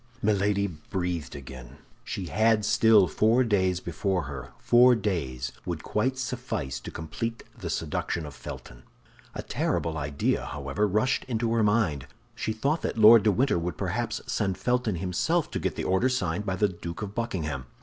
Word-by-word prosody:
Milady 100 Hz, -1 st, +2 dB
breathed 85 Hz, -3 st, -4 dB
again. 65 Hz, -3 st, -10 dB, 0.3 s
She 105 Hz, -5 st, -4 dB
had 110 Hz, +4 st, +2 dB
still 110 Hz, -3 st, +5 dB
four 110 Hz, +9 st, +3 dB
days 95 Hz, -5 st, +1 dB
before 90 Hz, +1 st, -1 dB
her. 70 Hz, -4 st, -7 dB
Four 125 Hz, +1 st, +6 dB
days 75 Hz, -, -2 dB
would -, -, -4 dB
quite 130 Hz, +5 st, 0 dB
suffice 125 Hz, -, -3 dB
to -, -, -8 dB
complete 115 Hz, +8 st, -5 dB
the -, -, -6 dB
seduction 85 Hz, -2 st, -2 dB
of 75 Hz, -, -8 dB
Felton. -, -, -9 dB, 0.5 s
A -, -, -4 dB
terrible 80 Hz, -1 st, -1 dB
idea, 70 Hz, 0 st, -1 dB
however, 70 Hz, +9 st, -1 dB
rushed 110 Hz, +7 st, +1 dB
into 115 Hz, -2 st, -1 dB
her 115 Hz, -, +2 dB
mind. 105 Hz, -, +1 dB, 0.3 s
She -, -, -3 dB
thought 140 Hz, +9 st, 0 dB
that -, -, -3 dB
Lord 110 Hz, +1 st, +9 dB
de 105 Hz, +1 st, +3 dB
Winter 120 Hz, -3 st, +2 dB
would 85 Hz, +1 st, -4 dB
perhaps -, -, -2 dB
send 95 Hz, -3 st, -1 dB
Felton 125 Hz, -1 st, 0 dB
himself 95 Hz, -, 0 dB
to -, -, -2 dB
get -, -, -2 dB
the -, -, -3 dB
order 95 Hz, +8 st, +2 dB
signed 105 Hz, -5 st, -1 dB
by 95 Hz, -, 0 dB
the 105 Hz, +3 st, +3 dB
Duke 85 Hz, +1 st, -6 dB
of 100 Hz, -1 st, -6 dB
Buckingham. 80 Hz, -, -3 dB
100 Hz, 170 wpm, -27 LUFS, 80-115 Hz, 0.5 s, Lord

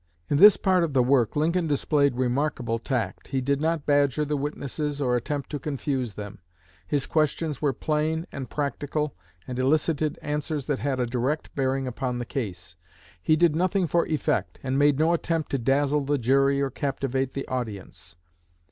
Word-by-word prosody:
In 145 Hz, -, +3 dB
this 205 Hz, +6 st, +9 dB
part 185 Hz, -3 st, +2 dB
of 160 Hz, -4 st, -1 dB
the 130 Hz, -2 st, +4 dB
work 125 Hz, -4 st, +2 dB
Lincoln 165 Hz, +3 st, +1 dB
displayed 145 Hz, -2 st, +2 dB
remarkable 125 Hz, -2 st, 0 dB
tact. 115 Hz, -6 st, -3 dB
He 135 Hz, -, -1 dB
did 140 Hz, +2 st, 0 dB
not 160 Hz, -2 st, 0 dB
badger 145 Hz, 0 st, +2 dB
the 150 Hz, +1 st, -1 dB
witnesses, 145 Hz, 0 st, -3 dB
or 125 Hz, -3 st, +1 dB
attempt 140 Hz, +4 st, -3 dB
to 145 Hz, -, -3 dB
confuse 135 Hz, -5 st, -3 dB
them. 105 Hz, 0 st, -8 dB, 0.5 s
His 145 Hz, -3 st, 0 dB
questions 155 Hz, -1 st, 0 dB
were 145 Hz, -2 st, +2 dB
plain 155 Hz, +4 st, -1 dB
and 135 Hz, -2 st, -6 dB
practical, 145 Hz, +1 st, -2 dB, 0.3 s
and 125 Hz, 0 st, -4 dB
elicited 155 Hz, +3 st, +1 dB
answers 150 Hz, -1 st, -2 dB
that 145 Hz, -3 st, -1 dB
had 135 Hz, -2 st, -1 dB
a 125 Hz, -, +2 dB
direct 125 Hz, +6 st, -2 dB
bearing 135 Hz, -1 st, 0 dB
upon 125 Hz, 0 st, -3 dB
the 120 Hz, -, -3 dB
case. 90 Hz, -10 st, -5 dB, 0.5 s
He 155 Hz, -, +3 dB
did 165 Hz, -1 st, +3 dB
nothing 185 Hz, +2 st, +1 dB
for 170 Hz, +2 st, +1 dB
effect, 145 Hz, -, -1 dB
and 135 Hz, +1 st, 0 dB
made 145 Hz, -1 st, +4 dB
no 160 Hz, +3 st, +3 dB
attempt 165 Hz, -2 st, -1 dB
to 140 Hz, -, 0 dB
dazzle 140 Hz, +4 st, +2 dB
the 145 Hz, +1 st, 0 dB
jury 135 Hz, +3 st, +3 dB
or 135 Hz, -, -1 dB
captivate 135 Hz, -1 st, -2 dB
the 135 Hz, -, -4 dB
audience. 100 Hz, -9 st, -6 dB
140 Hz, 175 wpm, -26 LUFS, 130-150 Hz, 0.5 s, this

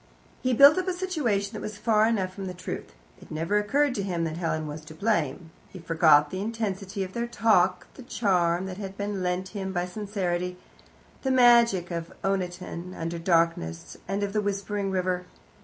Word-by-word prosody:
He 255 Hz, -, +1 dB
built 280 Hz, +8 st, +8 dB
up 370 Hz, -, -3 dB
a 370 Hz, -, +1 dB
situation 290 Hz, -, -1 dB
that -, -, -6 dB
was 210 Hz, -1 st, -6 dB
far 220 Hz, -1 st, +3 dB
enough 190 Hz, -5 st, 0 dB
from 195 Hz, 0 st, -6 dB
the 180 Hz, -, -6 dB
truth. 180 Hz, -, -6 dB, 0.3 s
It -, -, -14 dB
never 165 Hz, +7 st, 0 dB
occurred 275 Hz, +7 st, +2 dB
to 205 Hz, -, -2 dB
him 180 Hz, -4 st, -2 dB
that 160 Hz, 0 st, -3 dB
Helen 160 Hz, -2 st, -1 dB
was 150 Hz, +1 st, -7 dB
to 155 Hz, 0 st, -11 dB
blame. 165 Hz, -5 st, -1 dB, 0.2 s
He -, -, -11 dB
forgot 160 Hz, -3 st, +4 dB
the 185 Hz, -, -3 dB
intensity 200 Hz, -3 st, -3 dB
of 185 Hz, 0 st, -7 dB
their 235 Hz, 0 st, -2 dB
talk, 185 Hz, -6 st, +2 dB
the -, -, -12 dB
charm 185 Hz, -7 st, +1 dB
that 185 Hz, -1 st, -6 dB
had 195 Hz, -1 st, -7 dB
been 200 Hz, -1 st, -3 dB
lent 180 Hz, +1 st, -1 dB
him 190 Hz, -2 st, -4 dB
by 175 Hz, -2 st, -1 dB
sincerity, 180 Hz, -2 st, -3 dB, 0.6 s
the 265 Hz, -, -1 dB
magic 235 Hz, -8 st, +5 dB
of 170 Hz, -1 st, -4 dB
Oniton 180 Hz, -2 st, -3 dB
under 165 Hz, +1 st, -4 dB
darkness 165 Hz, -, 0 dB
and 195 Hz, +2 st, -1 dB
of 200 Hz, 0 st, -2 dB
the 210 Hz, -, +1 dB
whispering 200 Hz, 0 st, -2 dB
river. 185 Hz, -1 st, -1 dB
190 Hz, 190 wpm, -27 LUFS, 175-210 Hz, 0.6 s, built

